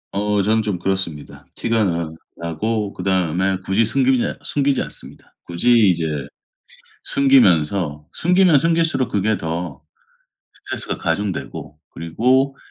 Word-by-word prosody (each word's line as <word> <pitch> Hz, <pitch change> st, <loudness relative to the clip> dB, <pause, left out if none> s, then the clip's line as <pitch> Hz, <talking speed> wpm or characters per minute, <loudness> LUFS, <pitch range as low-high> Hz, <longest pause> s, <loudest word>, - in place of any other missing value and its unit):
어 105 Hz, 0 st, +1 dB
저는 110 Hz, +2 st, +2 dB
좀 105 Hz, -4 st, -2 dB
그렇습니다. 90 Hz, -5 st, -4 dB
티가 115 Hz, -2 st, +1 dB
나 85 Hz, -3 st, -2 dB, 0.3 s
나고 100 Hz, +6 st, -2 dB
그다음에 95 Hz, 0 st, 0 dB
굳이 100 Hz, +4 st, +2 dB
숨기지 130 Hz, +2 st, +2 dB, 0.2 s
숨기지 140 Hz, -2 st, 0 dB
않습니다. -, -, -12 dB
굳이 90 Hz, +8 st, +1 dB, 0.2 s
이제 85 Hz, -2 st, -1 dB, 1.0 s
숨기면서 90 Hz, -, +2 dB
숨기면 180 Hz, -2 st, +4 dB
숨길수록 165 Hz, -4 st, +1 dB
그게 105 Hz, +2 st, +1 dB
더 80 Hz, -4 st, -5 dB, 0.7 s
스트레스가 -, -, -4 dB
가중되고 90 Hz, +2 st, -4 dB
그리고 130 Hz, +11 st, +1 dB
100 Hz, 285 characters per minute, -20 LUFS, 85-125 Hz, 1.0 s, 숨기면